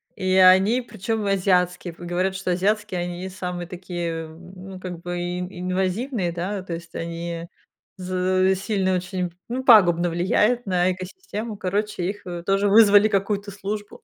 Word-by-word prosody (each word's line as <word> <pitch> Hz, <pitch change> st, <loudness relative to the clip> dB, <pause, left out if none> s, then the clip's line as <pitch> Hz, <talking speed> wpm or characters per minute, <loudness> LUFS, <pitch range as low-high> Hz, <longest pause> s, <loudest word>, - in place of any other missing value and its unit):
и 185 Hz, 0 st, -1 dB
они, 190 Hz, +6 st, +6 dB
причём, 225 Hz, -1 st, -3 dB
азиатские, 180 Hz, -3 st, +1 dB
в -, -, -23 dB
говорят, 180 Hz, +2 st, -1 dB
что 190 Hz, -1 st, -2 dB
азиатские 195 Hz, 0 st, 0 dB
они 175 Hz, +1 st, -5 dB
самые 180 Hz, -2 st, -5 dB
такие, 175 Hz, -2 st, -5 dB, 0.2 s
эм, 175 Hz, +3 st, -13 dB, 0.2 s
ну, 185 Hz, -, -8 dB
как 180 Hz, -2 st, -7 dB
бы 175 Hz, 0 st, -4 dB
ин 180 Hz, +1 st, -3 dB
инвазивные, 185 Hz, +3 st, -2 dB
да, 185 Hz, +4 st, -3 dB
то 180 Hz, -2 st, -6 dB
есть 165 Hz, 0 st, -8 dB
они 170 Hz, 0 st, -5 dB, 0.5 s
з 185 Hz, +1 st, +1 dB
сильно 190 Hz, -1 st, 0 dB
очень, 180 Hz, -1 st, -3 dB, 0.2 s
ну, 255 Hz, +2 st, -3 dB
пагубно 175 Hz, -8 st, +6 dB
влияют 210 Hz, +8 st, +1 dB
на 185 Hz, -1 st, +2 dB
экосистему, 210 Hz, -, -6 dB
короче, 205 Hz, 0 st, -2 dB
их, 205 Hz, -, -7 dB
э, 175 Hz, -1 st, -5 dB
тоже 195 Hz, +2 st, +2 dB
вызвали 205 Hz, 0 st, +7 dB
какую-то 200 Hz, 0 st, -1 dB
службу. 205 Hz, +1 st, -6 dB
185 Hz, 155 wpm, -23 LUFS, 175-205 Hz, 0.5 s, вызвали